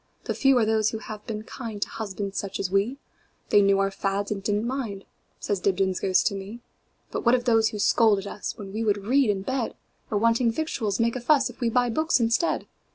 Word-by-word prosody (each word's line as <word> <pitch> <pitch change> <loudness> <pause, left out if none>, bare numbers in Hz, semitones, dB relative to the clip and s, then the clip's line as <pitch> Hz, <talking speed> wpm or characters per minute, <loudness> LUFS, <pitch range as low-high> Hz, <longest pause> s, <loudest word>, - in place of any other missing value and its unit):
The - - -2
few 270 -2 +4
are 230 - +3
those 220 -1 +2
who 220 - -4
have 215 -1 -9
been 215 -1 -4
kindTo 220 -3 -5
husbands 200 -2 -5
such 200 - -5
as 185 - -2
we; 200 +7 +1 0.5
They 205 - +6
knew 195 0 +4
our 195 0 +1
fads, 195 +1 -2
and 200 -2 -2
did 205 +1 0
n't 210 +2 -1
mind,"Says 210 -5 -5
Dibdin's 190 -1 +1
ghost 190 -1 +2
to - - +2
me."But 200 +5 -9
what 235 +1 +5
of 245 -1 -2
those 225 -3 +4
who 210 - -6
scold 215 +1 +4
at 195 - -5
usWhen 200 -1 -6
we 220 +2 -2
would 205 -2 0
read 260 +1 +3
in 195 -2 0
bed? 260 +1 -2 0.3
Or, 210 - 0
wanting 230 +2 +3
victuals, 225 -7 -2
make 230 +1 +1
a 255 - -3
fussIf 270 +2 +2
we 235 - +2
buy 245 +1 +2
books 315 +3 +2
instead? 230 +8 +1
215 Hz, 215 wpm, -25 LUFS, 200-235 Hz, 0.5 s, They